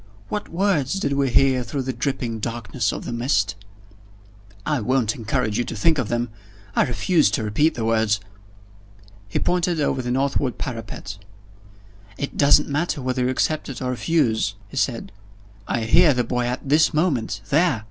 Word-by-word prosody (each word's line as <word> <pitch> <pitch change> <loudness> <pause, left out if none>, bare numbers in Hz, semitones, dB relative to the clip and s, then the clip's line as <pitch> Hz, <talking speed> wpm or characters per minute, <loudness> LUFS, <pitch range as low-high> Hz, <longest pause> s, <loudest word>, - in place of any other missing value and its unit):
"What 210 -1 -3
words 170 -5 +1
did 140 -8 -1
we 140 -1 +1
hear 130 0 +3
through 135 +2 -3
the 130 0 -3
dripping 120 -3 -2
darkness 115 0 -2
of - - -6
the - - -4
mist?" 115 -4 +1 1.1
"I 150 -3 +1
won't 120 -1 +1
encourage 115 -1 -1
you - - +2
to - - -5
think 155 +8 +2
of 125 - -1
them. 120 0 -1 0.5
I - - +4
refuse 155 +6 +2
to 115 - -1
repeat 145 +10 +2
the 115 - -2
words." 110 -2 +2 1.1
He 100 - -2
pointed 175 -2 +1
over 135 -3 0
the 125 - -4
northward 135 0 0
parapet. 115 -4 -6 1.0
"It 140 - -4
doesn't 145 +1 +5
matter 145 +2 -1
whether 130 -1 -1
you - - +1
accept 135 0 -1
or 125 -1 -2
refuse," 120 -7 +1
he - - -11
said, 120 -6 -1 0.6
"I 120 - -1
hear 150 +6 +5
the 125 - +1
boy 125 +1 -1
at 125 +3 -4
this 155 +3 +4
moment 135 - 0
there!" 155 -3 +3
130 Hz, 170 wpm, -23 LUFS, 115-145 Hz, 1.1 s, doesn't